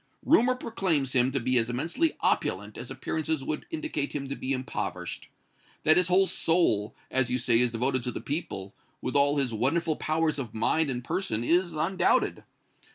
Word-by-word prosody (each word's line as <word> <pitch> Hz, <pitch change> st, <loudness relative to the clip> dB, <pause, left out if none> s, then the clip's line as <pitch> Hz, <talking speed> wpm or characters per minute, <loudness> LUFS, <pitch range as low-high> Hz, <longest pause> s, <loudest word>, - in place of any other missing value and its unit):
Rumor 255 Hz, -5 st, +4 dB
proclaims 175 Hz, -, -1 dB
him 130 Hz, +1 st, +3 dB
to 135 Hz, -, 0 dB
be 125 Hz, +1 st, +2 dB
as 115 Hz, +1 st, 0 dB
immensely 165 Hz, -, 0 dB
opulent -, -, 0 dB
as -, -, -7 dB
appearances 160 Hz, -2 st, -2 dB
would 150 Hz, -, -4 dB
indicate 310 Hz, -, -3 dB
him 140 Hz, -2 st, -3 dB
to 140 Hz, -, -3 dB
be 130 Hz, -, -4 dB
impoverished. 110 Hz, -9 st, -4 dB, 0.5 s
That 155 Hz, -, +6 dB
his 180 Hz, -1 st, +3 dB
whole 185 Hz, +2 st, +4 dB
soul, 160 Hz, -, +1 dB, 0.2 s
as 130 Hz, -2 st, +1 dB
you 125 Hz, -, +1 dB
say, 115 Hz, -2 st, +2 dB
is 125 Hz, 0 st, +3 dB
devoted 125 Hz, +2 st, -1 dB
to 125 Hz, -, -1 dB
the -, -, -5 dB
people, 120 Hz, -, -4 dB, 0.3 s
with 125 Hz, -, -4 dB
all 145 Hz, +1 st, +4 dB
his 130 Hz, -4 st, 0 dB
wonderful 150 Hz, +8 st, 0 dB
powers 155 Hz, -1 st, 0 dB
of 120 Hz, -5 st, -6 dB
mind 145 Hz, +7 st, +1 dB
and 125 Hz, -2 st, -3 dB
person, 120 Hz, -, -2 dB
is 175 Hz, +4 st, +2 dB
undoubted. 170 Hz, +5 st, +1 dB
140 Hz, 180 wpm, -28 LUFS, 125-165 Hz, 0.5 s, That